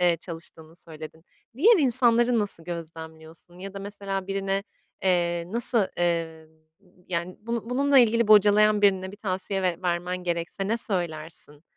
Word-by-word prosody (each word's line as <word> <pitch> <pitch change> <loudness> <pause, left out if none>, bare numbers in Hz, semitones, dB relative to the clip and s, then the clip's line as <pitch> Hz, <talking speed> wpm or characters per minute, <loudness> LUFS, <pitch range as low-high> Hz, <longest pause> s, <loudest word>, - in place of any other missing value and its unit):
eee, 175 -1 +3
çalıştığını 165 -2 -10
söyledin; 160 -1 -12 0.3
diğer 420 - +5
insanları 240 -3 +3
nasıl 205 -6 -1
gözlemliyorsun? 160 0 -9
Ya 195 +1 -9
da - - -6
mesela 195 -1 -5
birine, 195 0 -2 0.4
eee, 175 -2 +1
nasıl, 235 -3 +3
eee, 165 -2 -2 0.6
yani, 175 +1 -3
bunu 230 +1 -5
bununla 275 +2 +3
ilgili 235 -2 +3
bocalayan 210 0 +5
birine 190 -2 +2
bir - - -11
tavsiye 195 -1 -2
ver 180 -1 -1
vermen 175 0 -1
gerekse 170 +3 -3
ne 225 - +1
söylersin? 160 -7 -3
185 Hz, 140 wpm, -25 LUFS, 170-210 Hz, 0.6 s, diğer